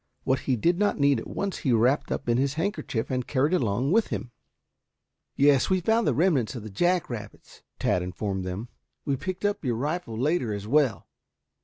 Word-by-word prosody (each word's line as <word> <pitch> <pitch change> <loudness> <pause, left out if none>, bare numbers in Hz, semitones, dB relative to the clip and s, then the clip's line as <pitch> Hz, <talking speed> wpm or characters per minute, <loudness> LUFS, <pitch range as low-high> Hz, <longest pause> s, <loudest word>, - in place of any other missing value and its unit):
What 130 - +1
he 130 - +4
did 170 - +1
not 205 0 +2
need 140 -1 +3
at - - -8
once 200 -1 -3
he 135 - 0
wrapped 120 +5 +2
up - - -3
in 120 +1 +2
his 140 +1 0
handkerchief 165 - -2
and 125 -1 -2
carried 145 +5 +1
along 125 - +1
with 225 +3 +3
him 120 - -5 0.5
" - - -58 0.3
"Yes, 140 -1 +4
we 190 -1 +3
found 225 +6 +2
the - - +3
remnants 150 - +2
of 115 - -6
the 110 - -8
jack 175 - +1
rabbits," 115 -4 -9 0.2
Tad 90 - +1
informed 95 +2 -3
them. 95 +6 -5 0.4
"We 140 -3 +1
picked 185 +7 -4
up 205 -3 0
your 125 -4 0
rifle 145 -2 -3
later, 130 -3 0
as 100 0 -6
well." 140 -1 +2
135 Hz, 200 wpm, -26 LUFS, 115-175 Hz, 0.5 s, he